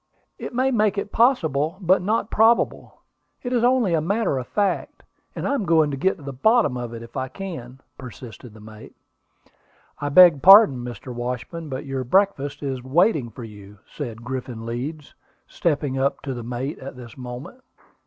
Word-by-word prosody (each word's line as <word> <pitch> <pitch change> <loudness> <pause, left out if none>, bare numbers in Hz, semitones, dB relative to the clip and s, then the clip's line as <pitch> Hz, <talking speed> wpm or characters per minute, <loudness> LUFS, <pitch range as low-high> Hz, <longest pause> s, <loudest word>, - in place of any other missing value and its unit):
"It - - -6
may 260 +2 +2
make 215 -4 +1
it 200 +1 -3
possible, 165 - +2
but 185 -1 +3
not 210 +3 -1
probable. 225 +2 +1 0.4
It 245 0 -3
is 240 -1 +1
only 245 -7 +3
a 160 - +2
matter 200 -4 0
of 125 - -7
fact, 200 -3 -2 0.3
and - - -3
I - - 0
am 275 - -1
going 160 -4 +3
to - - -2
get 190 +8 0
to 150 - -14
the 140 0 -6
bottom 220 - +2
of 120 -2 -5
it 115 - -8
if 115 - -14
I 130 - -2
can," 130 -5 -8 0.2
persisted 120 -3 -11
the - - -13
mate. 110 0 -13 1.0
"I 145 - -2
beg 165 -2 +7
pardon, 195 - +8
Mr. 120 +1 -7
Washburn, 125 +7 -5
but 130 +2 -5
your 135 -1 -3
breakfast 145 -2 0
is 130 -3 -4
waiting 150 - +2
for 120 - -10
you," 105 -2 -12
said 120 -6 -7
Griffin 125 -2 -6
Leeds, 135 +6 -6 0.3
stepping 145 -4 -1
up 140 +2 -1
to 135 - -4
the 120 - -6
mate 125 +4 -5
at 130 0 -9
this 120 -3 -11
moment. 125 - -9
140 Hz, 185 wpm, -23 LUFS, 125-190 Hz, 1.0 s, pardon